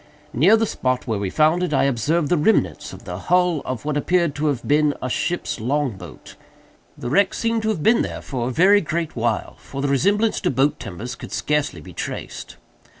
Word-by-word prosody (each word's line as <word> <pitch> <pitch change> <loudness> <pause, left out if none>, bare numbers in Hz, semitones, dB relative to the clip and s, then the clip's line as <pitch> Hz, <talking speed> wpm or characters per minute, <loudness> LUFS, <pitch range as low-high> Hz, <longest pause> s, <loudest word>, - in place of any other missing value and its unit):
Near 180 - +5
the 225 - +1
spot 130 - -1
where 110 -5 -2
we 100 -2 -2
found 155 - +3
it, 175 -5 0
I - - +3
observed 140 +5 +1
the 175 - +3
remnants 170 +8 +1
of - - -11
the - - -5
hull 180 -3 +2
of 130 +1 -5
what 150 -1 -1
appeared 170 0 +1
to 150 +2 -1
have 135 -5 -2
been 150 0 +3
a 130 - -4
ship's 175 -4 -2
long 135 +4 0
boat. 90 -5 -12 0.6
The 120 - -5
wreck 200 +5 +3
seemed 230 -1 0
to 220 - -1
have 185 -9 -2
been 230 +2 +4
there - - -4
for 125 -3 -3
a - - -2
very 195 +9 +5
great 165 -2 -3
while; 115 -2 -2
for 140 - -8
the 140 - 0
resemblance 205 - +2
to 180 - +1
boat 135 +3 +1
timbers 110 +5 -6
could - - -10
scarcely 150 - -1
be - - -12
traced. - - -6
150 Hz, 210 wpm, -22 LUFS, 125-180 Hz, 0.6 s, Near